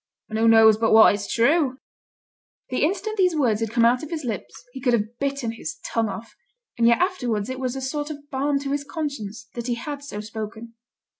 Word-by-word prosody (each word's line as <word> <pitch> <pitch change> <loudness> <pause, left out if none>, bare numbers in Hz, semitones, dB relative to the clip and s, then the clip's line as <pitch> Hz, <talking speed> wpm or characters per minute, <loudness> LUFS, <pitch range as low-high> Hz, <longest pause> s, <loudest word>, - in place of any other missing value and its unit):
'An' 220 - -2
who 225 +1 +3
knows 220 -1 +7
but 225 0 +2
what 220 -2 +8
it's 205 0 -4
true?' 260 +2 +2 0.9
The 255 - 0
instant 405 +6 -1
these 365 -3 +3
words 240 -8 +2
had 225 -1 -1
come 230 +1 +3
out 245 +2 +3
of 310 - -7
his 320 -3 -4
lips 205 - -4 0.2
he 265 - -8
could 245 -1 +2
have 230 +1 -1
bitten 275 -4 -1
his 225 -8 -6
tongue 225 -2 0
off. 225 +3 -8 0.5
And 230 - +5
yet 235 - +5
afterwards 250 - -1
it 260 - -5
was 255 -1 -2
a 270 - -4
sort 290 +3 -3
of 290 -1 -8
balm 280 +1 +1
to 275 -1 -4
his 285 0 -1
conscience 280 - -5
that 240 0 -5
he 240 - 0
had 285 +4 -6
so 280 -7 -6
spoken. 220 +2 -7
245 Hz, 220 wpm, -24 LUFS, 225-285 Hz, 0.9 s, what